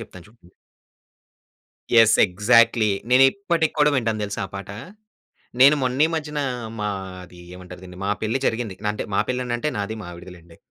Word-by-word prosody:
చెప్తాను 95 -6 -12
చూడండి. 110 -5 -24 1.5
Yes 110 -1 +5
exactly. 110 +3 +3 0.2
నేను 130 +1 +6
ఇప్పటికి 170 -5 -1
కూడా 150 0 +4
వింటాను 115 -4 -1
తెలుసా 100 0 -5
ఆ - - -21
పాట. 100 0 -7 0.9
నేను 140 +3 +8
మొన్న 130 +1 -1
ఈ - - -4
మధ్యన 150 -2 -4 0.4
మాది 95 -3 -6
ఏమంటారు 90 0 -12
దీన్ని, 90 0 -12
మా 100 - -1
పెళ్లి 110 +4 -1
జరిగింది. 115 -4 -2 0.2
అంటే 105 - -5
మా - - +2
పెళ్లి 125 0 -1
అని 120 -1 -3
అంటే 135 +6 -2
నాది 100 +2 -3
మా - - -9
ఆవిడది 85 +1 -11
లెండి. 85 -1 -18
110 Hz, 170 wpm, -22 LUFS, 95-125 Hz, 1.5 s, నేను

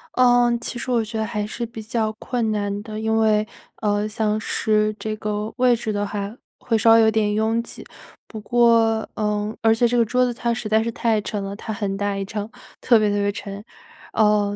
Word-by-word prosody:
呃， 245 -1 +5
其 240 - -6
实 245 - -6
我 240 -2 +2
觉 220 +1 -6
得 220 - 0
还 210 -2 -3
是 235 +3 -4
比 225 -1 -9
较 220 0 -1
困 230 0 -2
难 205 -1 -2
的， 215 0 -7
因 220 0 0
为， 215 -1 +3 0.4
呃， 210 0 +1
像 215 0 -1
是 215 -1 +1
这 215 0 -4
个 210 0 -3
位 250 -1 +4
置 220 -2 -3
的 205 0 -1
话， 205 +1 -4 0.2
会 230 - 0
稍 225 +1 +5
微 230 - +7
有 220 0 +4
点 210 -1 +1
拥 220 +2 +1
挤， - - -11 0.4
不 220 - -8
过， 230 -1 +3
呃 210 0 -1
而 225 0 +4
且 240 +1 +3
这 245 - -1
个 235 - +5
桌 250 +3 +2
子 245 - -1
它 235 0 -1
实 230 -2 -4
在 220 +1 +3
是 230 - -2
太 225 -2 0
沉 205 -1 -4
了， 195 +1 -5
它 220 - -6
很 205 -2 -2
大 205 0 -1
一 195 - -3
张， 210 +2 -5 0.3
特 240 - +5
别 215 -1 +2
特 205 - 0
别 205 0 +1
沉。 200 0 -7 0.5
呃， 210 -1 +2
220 Hz, 240 characters per minute, -22 LUFS, 210-230 Hz, 0.5 s, 微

